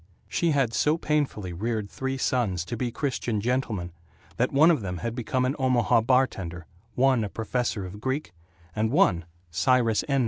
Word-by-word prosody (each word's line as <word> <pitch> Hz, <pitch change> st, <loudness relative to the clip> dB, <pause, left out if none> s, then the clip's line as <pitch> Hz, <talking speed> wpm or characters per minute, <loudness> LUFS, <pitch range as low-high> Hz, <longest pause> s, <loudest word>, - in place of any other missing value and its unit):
She 170 Hz, -, 0 dB
had 135 Hz, -6 st, +1 dB
so 150 Hz, +6 st, +2 dB
painfully 145 Hz, -, -1 dB
reared 110 Hz, +3 st, -2 dB
three 135 Hz, +5 st, -4 dB
sons 105 Hz, -10 st, 0 dB
to 120 Hz, -, -4 dB
be 120 Hz, +1 st, -2 dB
Christian 125 Hz, -5 st, -2 dB
gentlemen 110 Hz, -6 st, -1 dB, 0.5 s
that 125 Hz, -, +1 dB
one 155 Hz, +5 st, +6 dB
of 155 Hz, -, +1 dB
them 90 Hz, -2 st, -4 dB
had 115 Hz, +5 st, -3 dB
become 125 Hz, +2 st, -1 dB
an 130 Hz, +3 st, 0 dB
Omaha 125 Hz, -3 st, +3 dB
bartender, 100 Hz, -9 st, 0 dB, 0.3 s
one 130 Hz, -2 st, +3 dB
a 105 Hz, -, -3 dB
professor 115 Hz, -2 st, -2 dB
of 100 Hz, +3 st, -9 dB
Greek, 130 Hz, -2 st, -2 dB, 0.4 s
and 110 Hz, +1 st, +1 dB
one, 110 Hz, -, +3 dB, 0.3 s
Cyrus 115 Hz, +5 st, +2 dB
N. 140 Hz, -1 st, +2 dB
120 Hz, 170 wpm, -26 LUFS, 105-135 Hz, 0.5 s, one